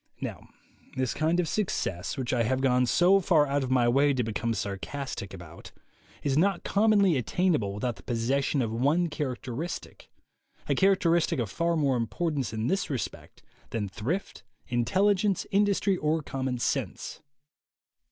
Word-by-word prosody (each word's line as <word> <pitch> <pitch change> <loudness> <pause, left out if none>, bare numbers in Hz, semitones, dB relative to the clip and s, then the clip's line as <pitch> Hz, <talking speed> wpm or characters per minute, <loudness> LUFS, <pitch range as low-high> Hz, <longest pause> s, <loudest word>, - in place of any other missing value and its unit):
Now - - -6 0.5
this 130 -2 0
kind 160 +3 +1
of 175 - +1
success, 120 - -2
which 130 -2 -2
I 120 - +2
have 130 +3 +1
gone 125 -1 +3
so 180 +8 +5
far 165 -5 +3
out 140 0 0
of 130 - -3
my 125 -2 +3
way 140 +3 +3
to 125 - +1
become 115 +1 -2
sarcastic 100 +2 -5
about, 85 -3 -11 0.5
is 140 -2 +1
not 185 +3 +2
commonly 200 -5 +3
attainable 140 - +1
without 120 +3 -2
the - - -13
possession 130 +3 0
of 110 - -2
one 145 +9 +1
characteristic, 135 +2 -5 0.6
a - - +2
characteristic 175 -4 +3
of 115 -6 -2
far 170 - 0
more 140 -4 +2
im 115 -1 -1
portance 150 -7 -2
in 110 0 -3
this 190 +9 0
respect 135 -5 -5 0.3
than 105 -3 -2
thrift, 120 - -4 0.2
intelligence, 190 - +1
industry 200 -1 +2
or 155 0 0
common 130 -2 -3
sense. 120 - -3
140 Hz, 150 wpm, -28 LUFS, 120-175 Hz, 0.6 s, so